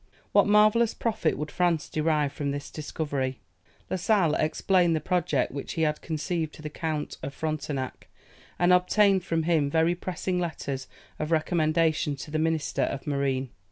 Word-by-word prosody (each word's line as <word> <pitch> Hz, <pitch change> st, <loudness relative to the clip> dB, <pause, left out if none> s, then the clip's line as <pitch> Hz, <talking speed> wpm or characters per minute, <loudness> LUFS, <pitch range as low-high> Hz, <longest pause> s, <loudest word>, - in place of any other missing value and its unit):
What -, -, +5 dB
marvellous 215 Hz, +2 st, +4 dB
profit 215 Hz, -8 st, 0 dB
would 150 Hz, +1 st, -4 dB
France 175 Hz, -3 st, +1 dB
derive 155 Hz, -2 st, 0 dB
from 145 Hz, -3 st, -3 dB
this 140 Hz, 0 st, -4 dB
discovery! 145 Hz, -4 st, -3 dB, 0.5 s
La -, -, -2 dB
Sale 180 Hz, -4 st, +2 dB
explained 170 Hz, +2 st, +2 dB
the -, -, +1 dB
project 175 Hz, -4 st, 0 dB
which 140 Hz, 0 st, -5 dB
he 160 Hz, -, 0 dB
had 150 Hz, -1 st, 0 dB
conceived 160 Hz, 0 st, -2 dB
to 155 Hz, -, -12 dB
the 150 Hz, -, -5 dB
Count 155 Hz, -2 st, -3 dB
of 140 Hz, -, -6 dB
Frontenac, 145 Hz, -4 st, -4 dB, 0.5 s
and 175 Hz, +1 st, +4 dB
obtained 190 Hz, +1 st, +4 dB
from 165 Hz, -3 st, 0 dB
him 155 Hz, -4 st, +2 dB
very 160 Hz, +3 st, +3 dB
pressing 180 Hz, 0 st, -3 dB
letters 140 Hz, -6 st, -4 dB, 0.3 s
of 155 Hz, -, -2 dB
recommendation 160 Hz, -2 st, +2 dB
to 140 Hz, +2 st, -9 dB
the 155 Hz, -, 0 dB
Minister 160 Hz, -1 st, 0 dB
of 135 Hz, -, -2 dB
Marine. 135 Hz, -3 st, -1 dB
160 Hz, 160 wpm, -27 LUFS, 150-175 Hz, 0.5 s, What